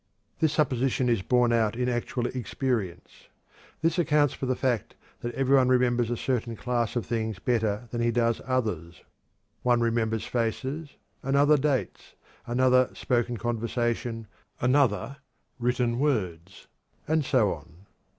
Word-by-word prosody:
This 160 -2 +3
supposition 130 -3 +1
is 115 -5 +2
borne 120 +3 +2
out 115 -2 +2
in 125 +1 -1
actual 120 0 -1
experience. 120 -7 -3 0.6
This 165 +2 +2
accounts 150 -4 +3
for 130 - -4
the 130 - +1
fact 125 -5 -1 0.2
that 120 - -4
every 135 0 +3
one 130 -2 +5
remembers 125 -2 +2
a 120 - -1
certain 120 -2 -2
class 120 0 -1
of 120 - -1
things 110 -3 -2
better 110 +1 -1
than 120 - -2
he 120 - +2
does 115 0 +1
others. 105 -10 -2 0.6
One 120 -1 +3
remembers 115 -1 0
faces, 130 +6 -2 0.3
another 140 +2 +4
dates, 140 -2 -2 0.3
another 130 +1 +3
spoken 120 -1 0
conversation, 115 0 -2 0.3
another 140 +2 +2 0.4
written 120 0 0
words, 95 - -2 0.4
and 160 0 +2
so 125 -7 +2
on. 85 +4 -14
120 Hz, 135 wpm, -27 LUFS, 115-130 Hz, 0.6 s, one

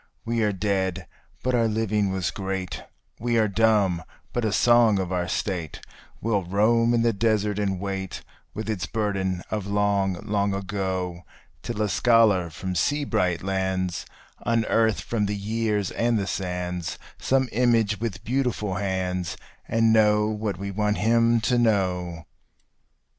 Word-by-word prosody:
We 115 0 0
are 105 -1 +2
dead, 95 -2 -1 0.4
but 130 - 0
our 115 -2 +3
living 105 -2 0
was 95 -2 -1
great: 95 -2 -4 0.4
we 120 0 0
are 110 -1 +4
dumb, 100 -4 +2 0.3
but 120 - -1
a 110 - +1
song 120 -1 +5
of 95 -1 -2
our 90 -1 -1
State 90 -6 -3 0.4
Will 105 -3 +1
roam 115 +6 +3
in 115 - +2
the 115 -1 +3
desert 105 -1 +1
and 95 -3 -1
wait, 95 -1 -4 0.3
with 110 +1 -4
its 105 -6 -2
burden 95 -4 -1
of 105 -3 -2
long, 100 -2 +1
long 100 -2 0
ago, 95 -3 -3 0.4
Till 110 -2 -2
a - - +1
scholar 105 -3 +4
from 90 +4 -5
sea 145 - +1
bright 90 -10 0
lands 95 -2 -1 0.4
unearth 115 -1 +2
from 105 -3 -1
the 105 0 -2
years 105 -1 -1
and 115 0 +1
the 100 - -1
sands 90 -2 -3 0.2
Some 130 0 +2
image 115 -3 +2
with 115 -4 -4
beautiful 120 -6 -1
hands, 90 -2 -2 0.3
and 115 0 +3
know 105 -1 +4
what 105 -3 -2
we 100 +1 -4
want 105 +1 0
him 115 +1 +3
to 125 +1 +2
know. 90 -7 0
105 Hz, 150 wpm, -25 LUFS, 95-115 Hz, 0.4 s, song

